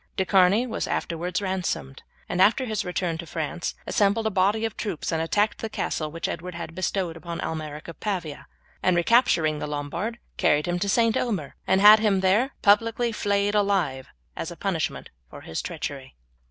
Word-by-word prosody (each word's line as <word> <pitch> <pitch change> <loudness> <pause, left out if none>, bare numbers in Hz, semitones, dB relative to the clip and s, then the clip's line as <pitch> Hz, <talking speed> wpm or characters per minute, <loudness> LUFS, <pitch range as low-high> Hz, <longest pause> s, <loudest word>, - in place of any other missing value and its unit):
De 190 - +1
Charny 195 +5 +4
was 230 - -3
afterwards 175 +4 -2
ransomed, 185 -8 -3 0.3
and 180 - 0
after 230 +7 +4
his 215 -4 -2
return 180 -2 -2
to 170 - -7
France 160 +3 -3
assembled 205 +2 +2
a 220 - +1
body 205 +4 +2
of 225 - -4
troops 195 -8 -3
and 160 -1 0
attacked 205 +6 +1
the 225 - -4
castle 155 -6 -2
which 165 +2 -4
Edward 175 +2 -5
had 170 -1 -6
bestowed 185 -1 -2
upon 170 0 -6
Almeric 155 -1 -5
of 170 - -9
Pavia, 180 -8 -4 0.3
and 175 -2 +2
capturing 165 - +3
the - - -4
Lombard, 150 +11 -3 0.2
carried 150 0 +3
him 175 0 -1
to 200 +2 -1
St. 230 +1 +3
Omer, 195 - -2
and 190 - +3
had 210 +1 +9
him 205 -3 +2
there 210 +9 +2
publicly 230 +3 +3
flayed 205 -1 0
alive 190 -11 +1 0.3
as - - -4
a - - -9
punishment - - -2 0.2
for - - -11
his 80 - -4
treachery. 140 - -6
185 Hz, 180 wpm, -25 LUFS, 165-210 Hz, 0.3 s, had